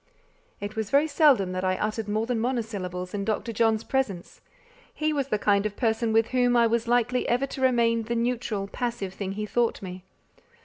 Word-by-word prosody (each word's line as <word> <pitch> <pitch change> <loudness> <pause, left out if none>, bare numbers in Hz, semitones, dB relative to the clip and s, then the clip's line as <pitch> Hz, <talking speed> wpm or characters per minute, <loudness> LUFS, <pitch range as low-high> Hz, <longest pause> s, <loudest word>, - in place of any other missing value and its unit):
It 205 +1 -6
was 220 -2 -3
very 285 +2 +4
seldom 285 - +3
that 185 0 -3
I 185 0 +1
uttered 215 0 -2
more 215 +2 0
than 240 -1 -1
monosyllables 205 -7 -3
in 200 -1 -2
Dr. 220 +3 -2
John's 225 0 +2
presence; 215 -10 -3 0.5
he 310 0 -1
was 280 -3 -1
the 215 - 0
kind 200 -1 +2
of 205 - -10
person 225 -1 +1
with 225 0 +3
whom 245 -1 +2
I 235 - +5
was 230 0 0
likely 245 +1 +1
ever 245 +3 +2
to 270 - -7
remain 235 -3 +3
the 230 +2 -3
neutral, 230 -4 -1
passive 220 -3 -4
thing 195 -1 -4
he 210 +1 -3
thought 235 +2 0
me. 185 -1 -7
225 Hz, 195 wpm, -26 LUFS, 205-245 Hz, 0.5 s, I